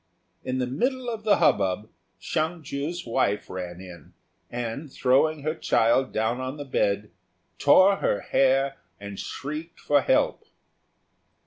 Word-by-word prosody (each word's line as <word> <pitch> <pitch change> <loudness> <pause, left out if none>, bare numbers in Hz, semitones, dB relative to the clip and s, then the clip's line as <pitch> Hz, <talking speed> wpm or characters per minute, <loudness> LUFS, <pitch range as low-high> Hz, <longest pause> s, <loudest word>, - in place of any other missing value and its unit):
In 130 0 -2
the 130 - 0
middle 245 - -1
of 220 -2 -6
the 210 - +5
hubbub 100 +1 +2 0.3
Hsiang 160 +1 -2
ju's 150 +6 -4
wife 105 -3 0
ran 90 -1 -6
in, 90 -3 -12 0.4
and, 120 +5 -5
throwing 140 +4 +2
her 155 +1 0
child 120 -3 +2
down 110 +3 0
on 130 +3 -4
the 145 - -6
bed, 100 -5 0 0.5
tore 195 +1 +6
her 100 - 0
hair 135 +1 +2 0.2
and 100 -1 -8
shrieked 155 +4 -6
for 145 -1 +3
help. - - +1
135 Hz, 135 wpm, -26 LUFS, 110-155 Hz, 0.5 s, tore